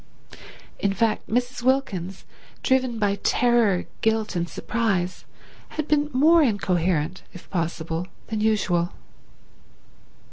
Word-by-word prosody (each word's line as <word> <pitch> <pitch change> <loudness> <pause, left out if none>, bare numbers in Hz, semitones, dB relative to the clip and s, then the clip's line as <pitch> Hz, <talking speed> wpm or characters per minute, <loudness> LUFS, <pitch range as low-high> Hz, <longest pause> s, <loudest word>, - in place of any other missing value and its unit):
In 200 -1 +1
fact 225 +2 0
Mrs. 245 +3 -1
Wilkins, 200 -9 0 0.4
driven 260 -3 +2
by 205 -2 +1
terror, 235 -6 +3 0.2
guilt 220 -2 +1
and 170 0 -1
surprise, 195 -6 -1 0.5
had 310 -1 -1
been 295 -1 +2
more 315 +6 +5
incoherent 185 - +1
if 180 - -12
possible 165 -1 -2 0.2
than 220 -1 -2
usual. 195 -5 +1
210 Hz, 105 wpm, -24 LUFS, 180-245 Hz, 0.5 s, more